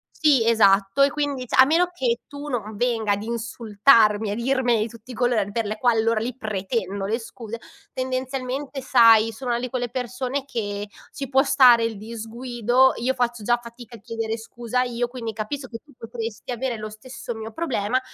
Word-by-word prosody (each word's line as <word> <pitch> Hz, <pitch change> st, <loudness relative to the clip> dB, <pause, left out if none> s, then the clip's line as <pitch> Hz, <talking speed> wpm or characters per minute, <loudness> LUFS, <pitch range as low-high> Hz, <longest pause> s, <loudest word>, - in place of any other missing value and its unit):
Sì, 285 Hz, -7 st, +4 dB
esatto. 200 Hz, +1 st, +4 dB
E 280 Hz, -, +5 dB
quindi 285 Hz, -4 st, -2 dB
cioè -, -, -6 dB
a -, -, +9 dB
meno 330 Hz, +5 st, +3 dB
che 245 Hz, -8 st, -1 dB
tu 285 Hz, +1 st, -8 dB
non 220 Hz, -5 st, -4 dB
venga 225 Hz, -3 st, +1 dB
ad 200 Hz, +1 st, -2 dB
insultarmi, 220 Hz, -1 st, +2 dB
a -, -, -1 dB
dirmene 245 Hz, -1 st, +1 dB
di 220 Hz, -, -1 dB
tutti 230 Hz, +3 st, -12 dB
i -, -, -8 dB
colori, 220 Hz, -4 st, 0 dB
per 230 Hz, 0 st, -1 dB
le 215 Hz, +1 st, -3 dB
quali 240 Hz, -2 st, +2 dB
allora 230 Hz, 0 st, +1 dB
lì 245 Hz, +2 st, -4 dB
pretendo 200 Hz, -2 st, -3 dB
le 225 Hz, +3 st, 0 dB
scuse, 230 Hz, 0 st, -8 dB, 0.3 s
tendenzialmente 260 Hz, +1 st, -3 dB
sai, 230 Hz, -4 st, +6 dB
sono 255 Hz, 0 st, -5 dB
una 235 Hz, -, 0 dB
di 255 Hz, -, -3 dB
quelle 245 Hz, -2 st, -3 dB
persone 255 Hz, +2 st, -3 dB
che 205 Hz, -6 st, -4 dB, 0.2 s
ci 275 Hz, -3 st, -6 dB
può 265 Hz, 0 st, +4 dB
stare 250 Hz, -4 st, +6 dB
il 225 Hz, -2 st, -2 dB
disguido, 235 Hz, +3 st, +1 dB
io 255 Hz, +3 st, 0 dB
faccio 240 Hz, -3 st, -1 dB
già 240 Hz, +1 st, +2 dB
fatica 235 Hz, 0 st, -12 dB
a 215 Hz, -, -17 dB
chiedere 225 Hz, 0 st, -3 dB
scusa 235 Hz, +2 st, -3 dB
io, 245 Hz, -1 st, -1 dB
quindi 240 Hz, -3 st, -5 dB
capisco 245 Hz, +5 st, -5 dB
che 230 Hz, -, -7 dB
tu 290 Hz, -, -20 dB
potresti 230 Hz, +1 st, -6 dB
avere 245 Hz, 0 st, -2 dB
lo 215 Hz, 0 st, -5 dB
stesso 245 Hz, +3 st, -8 dB
mio 220 Hz, 0 st, -7 dB
problema, 255 Hz, -5 st, -1 dB
235 Hz, 190 wpm, -23 LUFS, 220-255 Hz, 0.3 s, a